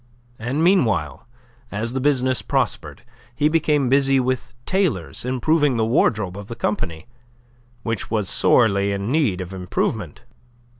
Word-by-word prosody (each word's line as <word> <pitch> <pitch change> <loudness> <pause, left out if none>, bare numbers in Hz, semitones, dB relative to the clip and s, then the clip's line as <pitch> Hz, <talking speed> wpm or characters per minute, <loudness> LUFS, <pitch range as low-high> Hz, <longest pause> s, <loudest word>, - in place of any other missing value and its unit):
And 130 +8 -1
meanwhile 110 - +1 0.4
as 110 +4 -2
the 130 - -1
business 130 -2 +1
prospered, - - -2 0.3
he 150 +3 +2
became 150 -4 +2
busy 135 +1 +3
with 130 -1 -2
tailors, 160 - -1
improving 135 +2 +1
the 110 - +2
wardrobe 110 -5 +1
of 100 - -9
the 115 - -6
company, 90 -8 -3 0.8
which 115 -2 -3
was 105 -3 -1
sorely 100 -4 +3
in 100 +4 -3
need 130 - +1
of 90 +1 -7
improvement. 90 -1 -3
120 Hz, 135 wpm, -22 LUFS, 100-140 Hz, 0.8 s, busy